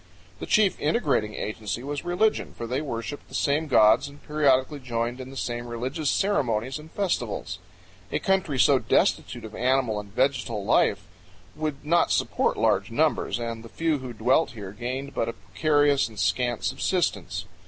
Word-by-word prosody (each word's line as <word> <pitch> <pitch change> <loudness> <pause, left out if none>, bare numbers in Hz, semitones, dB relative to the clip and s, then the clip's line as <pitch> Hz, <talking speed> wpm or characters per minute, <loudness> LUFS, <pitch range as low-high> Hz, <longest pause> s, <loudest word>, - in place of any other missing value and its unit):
The - - -6
chief 210 -4 +3
integrating 140 - +1
agency 105 +1 -4
was 145 +1 -4
religion, 180 +5 0
for 120 - -4
they 125 +4 -2
worshiped 115 -2 -5
the - - -9
same 150 +2 +1
gods 110 0 +5
and 140 0 -13
periodically 145 -1 +2
joined 120 -1 -3
in 130 - -8
the 135 - -9
same 120 -1 -3
religious 130 +6 -2
ceremonies 130 - 0
and 155 +1 -12
festivals. 195 +2 -2 0.5
A - - +1
country 190 -8 0
so 135 +1 +5
destitute - - +1
of - - -9
animal 125 -3 +1
and 100 -1 -9
vegetal 125 -4 0
life - - +3 0.5
would 150 -2 -4
not 170 +2 +3
support - - +1
large - - +2
numbers, - - +1
and 115 -1 -5
the 115 - -11
few 160 0 0
who 130 -1 -7
dwelt 125 +6 +2
here 100 -4 -7
gained 130 +6 -5
but 115 - -1
a - - -4
precarious 145 - +2
and 110 - -14
scant 120 0 0
subsistence. 95 - -1
130 Hz, 165 wpm, -26 LUFS, 115-150 Hz, 0.5 s, gods